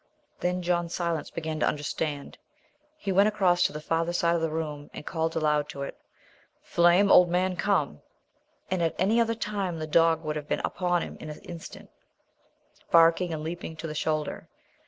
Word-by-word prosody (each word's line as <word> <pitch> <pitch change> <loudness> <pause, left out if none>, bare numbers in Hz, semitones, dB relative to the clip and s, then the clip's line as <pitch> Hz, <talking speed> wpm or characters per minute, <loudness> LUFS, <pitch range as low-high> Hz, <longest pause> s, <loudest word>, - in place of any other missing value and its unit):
Then 180 0 -1
John 175 -1 0
Silence 170 -2 -2
began 160 -1 -4
to - - +2
understand. 145 -1 -3 0.6
He 200 -10 -3
went 200 +2 +5
across 185 -5 +2
to - - -11
the 150 - -6
farther 165 +2 -1
side 170 -1 +2
of 170 - 0
the 165 - 0
room 150 -2 -4
and - - -8
called 165 -2 -2
aloud 150 -2 +1
to 140 - -5
it. - - -6 0.7
"Flame, 175 +4 +4
old 180 -1 +7
man! 180 +1 +1
come!" 175 - 0 0.7
At 170 -3 0
any 215 +6 +3
other 230 0 +1
time 200 -6 -3
the 155 - -3
dog 165 +1 +3
would 155 0 -2
have 150 -1 -6
been - - 0
upon 175 -1 0
him - - -8
in 155 - -8
an 150 - -8
instant, 170 -2 -10 1.0
barking 165 +1 +5
and 155 -1 -4
leaping 165 0 -5
to 165 - -7
the 155 - -4
shoulder. 155 0 -2
165 Hz, 180 wpm, -27 LUFS, 155-180 Hz, 1.0 s, old